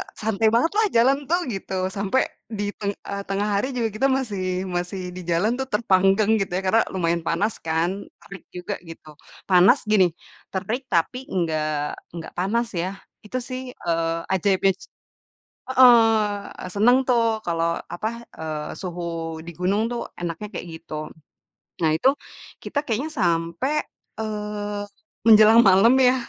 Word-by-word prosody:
santai 220 0 0
banget 235 +9 +3
lah 440 - +4
jalan 260 +4 +5
tuh 350 +2 +1
gitu, 195 -2 -6 0.2
sampai 200 +6 +1 0.2
di 205 -2 -3
teng 200 -1 -1
eee, 200 0 -6
tengah 195 +1 -1
hari 260 +4 -3
juga 230 -2 0
kita 240 +6 +1
masih 200 -9 -1
masih 175 +2 -3
di 180 +1 -8
jalan 175 +6 +2
tuh 265 - -2
terpanggang 200 -1 +3
gitu 195 -3 -2
ya 185 - 0
karena 225 +4 +4
lumayan 170 -1 +1
panas 200 +6 +1
kan, 160 +1 0 0.3
terik 195 -3 -11
juga 180 +3 -4
gitu. 165 -1 -11 0.4
Panas 190 +9 +6
gini, 195 -4 +6 0.5
terik 230 +8 -3
tapi 170 +8 +2
nggak 160 -4 -1 0.5
nggak 165 -1 -7
panas 230 +6 0
ya 185 - -2 0.4
itu 255 +5 -4
sih, 255 +1 -5
eee, 165 -1 -1
ajaibnya 190 +1 +3
se - - -14 0.9
heeh, 250 -2 +9 0.7
seneng 220 +6 +5
tuh 245 -2 +3 0.2
kalau, 165 -1 0 0.3
apa, 215 +5 -2 0.3
eee, 155 -1 -4
suhu 175 -2 -5 0.4
di 170 - -6
gunung 195 +4 +1
tuh 240 - -3 0.2
enaknya 175 +4 -4
kayak - - -6
gitu. 155 - -10 0.9
Nah 160 - +4
itu 260 - +4 0.5
kita 285 - -3
kayaknya 250 +8 -1
sampai, 170 - 0 0.5
eee, 210 -1 -4 0.4
menjelang 220 +1 +8
malam 195 +6 +6
ya 255 -1 +5
200 Hz, 145 wpm, -23 LUFS, 175-230 Hz, 0.9 s, heeh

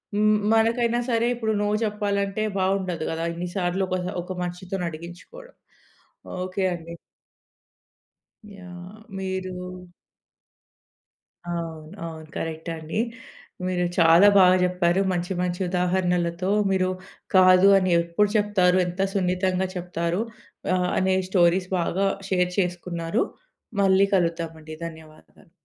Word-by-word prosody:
హ్మ్ 215 0 +4 0.2
మనకైనా 235 +1 +2
సరే 230 0 +2
ఇప్పుడు 220 -2 -1
నో 205 - 0 0.2
చెప్పాలంటే 205 0 -1 0.2
బావుండదు 185 -4 0
గదా! 165 +1 -2
ఇన్ని 175 +1 -4
సార్లు 180 +1 0
ఒక 185 - 0 0.3
ఒక - - -16
మనిషితోనడిగించుకోడం. 180 - -6 0.9
ఓకె 185 +1 -3
అండి. 170 0 -9 1.6
యాహ్! 180 +2 -11 0.2
మీరూ 190 -1 -3 2.0
అవును. 165 -2 -5 0.2
అవును. 160 -1 -8
కరెక్టండి. 160 +2 -4 0.7
మీరు 180 -1 0
చాలా 170 +3 +7
బాగ 185 -1 +7
జెప్పారు 180 0 +2
మంచి 180 +1 -2
మంచి 180 0 -2
ఉదాహరణలతో. 180 0 0 0.2
మీరు 185 -1 +2 0.5
కాదు 185 +1 +7
అని 185 -1 0
ఎప్పుడు 170 +5 +1
చెప్తారు. 190 -3 +3
ఎంత 175 +2 -7
సున్నితంగా 185 0 0
చెప్తారు 175 +1 -2 0.5
ఆహ్, 180 0 +1
అనే 190 0 +2
స్టోరీస్ 180 0 +3
బాగా 190 +3 0 0.2
షేర్ 180 -1 +1
చేసుకున్నారు. 175 +1 -1 0.6
మళ్ళీ 195 0 +4
కలుద్దామండి. 165 -3 -2
ధన్యవాదాలు. 160 -2 -13
180 Hz, 105 wpm, -24 LUFS, 170-195 Hz, 2.0 s, చాలా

